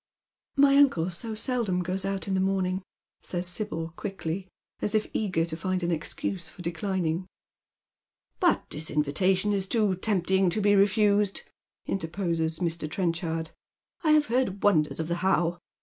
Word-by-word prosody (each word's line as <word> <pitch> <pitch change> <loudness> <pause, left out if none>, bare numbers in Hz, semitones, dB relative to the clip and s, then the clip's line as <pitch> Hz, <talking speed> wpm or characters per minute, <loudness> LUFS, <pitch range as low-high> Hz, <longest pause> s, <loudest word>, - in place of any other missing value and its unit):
"My 280 0 +6
uncle 185 -12 +4
so 220 +6 -3
seldom 215 -6 0
goes 185 +2 -2
out 195 0 -2
in 195 - -1
the 190 - +2
morning," 190 -1 0 0.4
says 175 0 -2
Sibyl, 165 -3 -2
quickly, 190 -1 -4 0.3
as 210 - 0
if 215 - +2
eager 185 -6 0
to 165 -1 -4
find 185 +2 -2
an 170 - 0
excuse 165 +2 -3
for 175 - -11
declining. 175 0 -1 0.5
" - - -57
But - - +2
this 155 +2 -2
invitation 185 +7 +1
is 195 -1 0
too 210 -2 +2
tempting 190 -1 +2
to 175 - -1
be 205 0 +4
refused," 205 0 +3 0.4
interposes 165 -3 -1
Mr. 165 -3 -2
Trenchard. 165 -1 -2 0.3
" - - -40
I 310 -2 +5
have 305 -1 +5
heard 235 -6 0
wonders 160 -8 +3
of 160 - -2
the 170 +1 -1
How. 175 -2 +1
185 Hz, 160 wpm, -27 LUFS, 170-205 Hz, 0.5 s, My